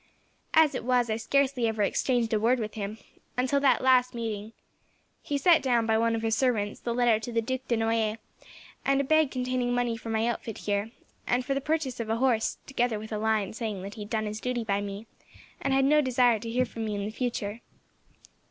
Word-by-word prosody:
As 315 Hz, -2 st, +6 dB
it 255 Hz, -, -4 dB
was, 245 Hz, -2 st, +2 dB
I -, -, +1 dB
scarcely 260 Hz, +1 st, +1 dB
ever 220 Hz, -2 st, 0 dB
exchanged 235 Hz, +2 st, +1 dB
a 215 Hz, -, +3 dB
word 235 Hz, +4 st, +3 dB
with 215 Hz, -2 st, -4 dB
him, 210 Hz, 0 st, -5 dB, 0.4 s
until 260 Hz, +3 st, +2 dB
that 275 Hz, -2 st, +3 dB
last 250 Hz, -1 st, +4 dB
meeting. 220 Hz, -2 st, -4 dB, 0.7 s
He 285 Hz, -, -2 dB
sent 330 Hz, +1 st, +5 dB
down, 240 Hz, -4 st, +2 dB
by 220 Hz, 0 st, +2 dB
one 230 Hz, 0 st, +2 dB
of 225 Hz, -, -3 dB
his 225 Hz, 0 st, +1 dB
servants, 220 Hz, -5 st, 0 dB
the 240 Hz, -, -3 dB
letter 240 Hz, -3 st, +3 dB
to 235 Hz, +2 st, -6 dB
the 230 Hz, -, +1 dB
Duc 260 Hz, +3 st, -3 dB
de 235 Hz, -, +1 dB
Noailles, 225 Hz, -1 st, 0 dB, 0.7 s
and 275 Hz, 0 st, +2 dB
a -, -, +2 dB
bag 315 Hz, +1 st, +3 dB
containing 250 Hz, -1 st, -1 dB
money 245 Hz, -1 st, 0 dB
for 225 Hz, 0 st, -8 dB
my 225 Hz, 0 st, +1 dB
outfit 235 Hz, -2 st, -3 dB
here, 205 Hz, +1 st, -2 dB, 0.4 s
and 245 Hz, +1 st, +1 dB
for 275 Hz, -, 0 dB
the 275 Hz, -, -1 dB
purchase 300 Hz, -4 st, -1 dB
of 230 Hz, -2 st, -4 dB
a 225 Hz, -, +1 dB
horse, 235 Hz, -2 st, +1 dB
together 245 Hz, -4 st, 0 dB
with 220 Hz, +1 st, -8 dB
a 215 Hz, -, -2 dB
line 215 Hz, -3 st, 0 dB
saying 215 Hz, -4 st, -4 dB
that 200 Hz, +1 st, -7 dB
he 215 Hz, -, -9 dB
had 205 Hz, -, -7 dB
done 220 Hz, -1 st, -1 dB
his 215 Hz, +1 st, -5 dB
duty 250 Hz, -2 st, -2 dB
by 200 Hz, -2 st, 0 dB
me, 200 Hz, +2 st, -6 dB, 0.6 s
and 275 Hz, -, -1 dB
had 270 Hz, 0 st, +3 dB
no 300 Hz, +2 st, +5 dB
desire 245 Hz, -4 st, +3 dB
to 230 Hz, -, -6 dB
hear 250 Hz, +2 st, +1 dB
from 225 Hz, -1 st, -6 dB
me 210 Hz, -1 st, -2 dB
in 200 Hz, 0 st, -3 dB
the 210 Hz, -, -4 dB
future. 225 Hz, -2 st, -3 dB
230 Hz, 225 wpm, -28 LUFS, 220-255 Hz, 0.7 s, As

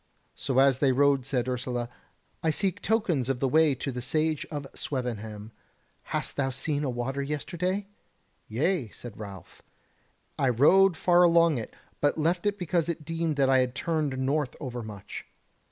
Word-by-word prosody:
So 130 Hz, -, -2 dB
as 135 Hz, -1 st, +5 dB
they 140 Hz, -2 st, +4 dB
rode 135 Hz, 0 st, +3 dB
said 130 Hz, -2 st, 0 dB
Ursula: 125 Hz, -1 st, -2 dB, 0.5 s
"I 160 Hz, -, +1 dB
seek 185 Hz, +4 st, 0 dB
tokens 180 Hz, -, +1 dB
of 135 Hz, -2 st, 0 dB
the 135 Hz, -, +1 dB
way 155 Hz, +1 st, +4 dB
to 135 Hz, +2 st, -4 dB
the 125 Hz, -1 st, -5 dB
Sage 155 Hz, +3 st, 0 dB
of 145 Hz, -3 st, -5 dB
Swevenham. 110 Hz, -5 st, -4 dB, 0.5 s
Hast -, -, -3 dB
thou 135 Hz, -1 st, +1 dB
seen 145 Hz, +3 st, -2 dB
a 140 Hz, -, 0 dB
water 130 Hz, +3 st, -2 dB
yesterday?" 175 Hz, +7 st, -2 dB, 0.6 s
"Yea," 130 Hz, -, 0 dB
said 115 Hz, 0 st, -10 dB
Ralph, 100 Hz, -3 st, -10 dB, 0.8 s
"I 135 Hz, -, +3 dB
rode 170 Hz, +9 st, +5 dB
far 175 Hz, +1 st, +4 dB
along 170 Hz, -5 st, +5 dB
it, 110 Hz, -, -8 dB, 0.2 s
but 145 Hz, +1 st, +2 dB
left 170 Hz, +4 st, +1 dB
it 205 Hz, 0 st, 0 dB
because 175 Hz, -2 st, 0 dB
I -, -, +2 dB
deemed 165 Hz, 0 st, -3 dB
that 135 Hz, -1 st, +3 dB
it 130 Hz, -2 st, +3 dB
turned 155 Hz, -2 st, -1 dB
north 135 Hz, +1 st, 0 dB
overmuch." 110 Hz, -6 st, -7 dB
140 Hz, 160 wpm, -28 LUFS, 125-165 Hz, 0.8 s, as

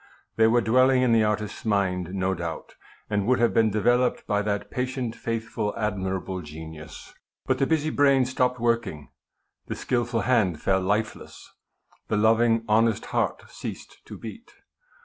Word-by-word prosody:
They 110 Hz, 0 st, +5 dB
were 120 Hz, +2 st, +3 dB
dwelling 130 Hz, +3 st, +4 dB
in 125 Hz, -, +3 dB
the 115 Hz, -1 st, +4 dB
artist's 105 Hz, 0 st, -2 dB
mind 95 Hz, -4 st, 0 dB
no 95 Hz, 0 st, 0 dB
doubt, 85 Hz, -2 st, -6 dB, 0.3 s
and 105 Hz, -1 st, -1 dB
would 130 Hz, 0 st, +4 dB
have 120 Hz, -1 st, +2 dB
been 110 Hz, -1 st, +4 dB
developed* 120 Hz, +4 st, +1 dB
by 105 Hz, 0 st, +1 dB
that 100 Hz, 0 st, -3 dB
patient, 125 Hz, -2 st, -3 dB
faithful, 115 Hz, -2 st, -3 dB
admi 95 Hz, -3 st, -1 dB
rable 95 Hz, 0 st, -5 dB
genius. 80 Hz, +1 st, -10 dB, 0.3 s
But -, -, 0 dB
the 135 Hz, -, +2 dB
busy 155 Hz, -1 st, +1 dB
brain 140 Hz, -3 st, +4 dB
stopped 125 Hz, 0 st, 0 dB
working, 115 Hz, -10 st, -1 dB, 0.6 s
the -, -, -4 dB
skilful 120 Hz, -2 st, -1 dB
hand 105 Hz, -11 st, +2 dB
fell 95 Hz, +3 st, +1 dB
lifeless, 105 Hz, +4 st, -3 dB, 0.6 s
the 105 Hz, -, 0 dB
loving, 115 Hz, +1 st, +3 dB
honest 110 Hz, 0 st, +2 dB
heart -, -, 0 dB
ceased -, -, -8 dB
to -, -, -9 dB
beat. 115 Hz, -, -10 dB
110 Hz, 155 wpm, -25 LUFS, 100-120 Hz, 0.6 s, They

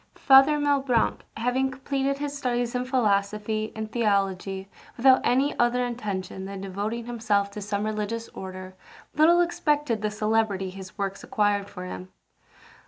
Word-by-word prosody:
Father 270 Hz, +2 st, +6 dB
Malebranche 275 Hz, -5 st, +1 dB, 0.2 s
having 250 Hz, +3 st, +1 dB
completed 270 Hz, +1 st, -2 dB
his 290 Hz, 0 st, -4 dB
studies 245 Hz, -3 st, -1 dB
in 250 Hz, 0 st, -1 dB
philosophy 215 Hz, -3 st, 0 dB
and 220 Hz, 0 st, -5 dB
theology 195 Hz, -4 st, 0 dB, 0.3 s
without 260 Hz, +2 st, +6 dB
any 270 Hz, +4 st, +2 dB
other 245 Hz, +1 st, +2 dB
intention 195 Hz, -6 st, -4 dB
than 195 Hz, 0 st, -6 dB
devoting 205 Hz, +5 st, -4 dB
himself 215 Hz, -4 st, 0 dB
to 210 Hz, -, -7 dB
some 205 Hz, +1 st, -2 dB
religious 215 Hz, +2 st, -3 dB
order, 185 Hz, 0 st, -8 dB, 0.4 s
little 335 Hz, +3 st, +5 dB
expected 295 Hz, -9 st, 0 dB
the 215 Hz, -, 0 dB
celebrity 215 Hz, -3 st, 0 dB
his 190 Hz, 0 st, -10 dB
works 195 Hz, -1 st, -3 dB
acquired 205 Hz, -5 st, 0 dB
for 180 Hz, -, -8 dB
him. 185 Hz, 0 st, -7 dB
220 Hz, 140 wpm, -26 LUFS, 200-260 Hz, 0.4 s, Father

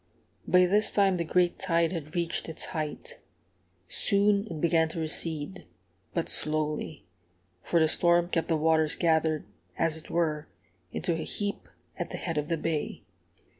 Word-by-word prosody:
By 180 Hz, 0 st, +5 dB
this 205 Hz, +4 st, +2 dB
time 195 Hz, -2 st, +3 dB
the 170 Hz, -, -1 dB
great 175 Hz, +1 st, +1 dB
tide 170 Hz, -3 st, +1 dB
had 160 Hz, -3 st, -6 dB
reached 170 Hz, -1 st, -1 dB
its 160 Hz, -, 0 dB
height. 160 Hz, -, -5 dB, 0.7 s
Soon 200 Hz, 0 st, +3 dB
it 160 Hz, -5 st, -6 dB
began 165 Hz, 0 st, +2 dB
to 165 Hz, -, -6 dB
recede, 160 Hz, +2 st, -3 dB, 0.5 s
but -, -, 0 dB
slowly, 155 Hz, 0 st, 0 dB, 0.6 s
for 170 Hz, -, +1 dB
the 160 Hz, -, +4 dB
storm 175 Hz, +2 st, +3 dB
kept 165 Hz, -2 st, 0 dB
the 165 Hz, -, +1 dB
waters 160 Hz, 0 st, +2 dB
gathered, 160 Hz, -2 st, +1 dB, 0.3 s
as 165 Hz, -1 st, +1 dB
it 160 Hz, -, -12 dB
were, 155 Hz, -3 st, -1 dB, 0.4 s
into 175 Hz, -, -1 dB
a 165 Hz, -, -3 dB
heap 205 Hz, -1 st, -3 dB, 0.3 s
at -, -, -3 dB
the -, -, -5 dB
head 165 Hz, -4 st, -2 dB
of 150 Hz, -, -4 dB
the 165 Hz, -, 0 dB
bay. 160 Hz, -1 st, -3 dB
165 Hz, 160 wpm, -28 LUFS, 155-180 Hz, 0.7 s, By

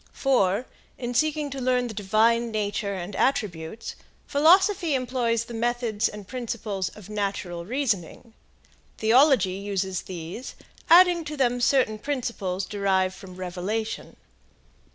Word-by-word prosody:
For, 235 Hz, -5 st, +2 dB, 0.3 s
in 245 Hz, -1 st, -4 dB
seeking 300 Hz, +2 st, 0 dB
to 270 Hz, 0 st, -5 dB
learn 250 Hz, 0 st, +2 dB
the 235 Hz, -, -5 dB
divine 220 Hz, +3 st, +2 dB
nature 205 Hz, -2 st, -2 dB
and 185 Hz, +2 st, -6 dB
attributes, 210 Hz, -5 st, -1 dB, 0.3 s
philosophy 345 Hz, +2 st, +4 dB
employs 245 Hz, -3 st, 0 dB
the 235 Hz, -, -9 dB
methods 235 Hz, -1 st, 0 dB
and 210 Hz, -2 st, -10 dB
principles 220 Hz, -6 st, -3 dB
of 210 Hz, -4 st, -12 dB
natural 195 Hz, -4 st, -3 dB
reasoning; 230 Hz, -, -2 dB, 0.6 s
theology 230 Hz, -4 st, +4 dB
uses 190 Hz, -2 st, -2 dB
these, 180 Hz, +7 st, -7 dB, 0.3 s
adding 350 Hz, 0 st, +7 dB
to 300 Hz, 0 st, -5 dB
them 245 Hz, -2 st, +1 dB
certain 240 Hz, -5 st, +2 dB
principles 210 Hz, -9 st, -3 dB
derived 190 Hz, -2 st, +1 dB
from 185 Hz, -1 st, -12 dB
revelation. 185 Hz, +5 st, -4 dB
225 Hz, 120 wpm, -25 LUFS, 195-255 Hz, 0.6 s, adding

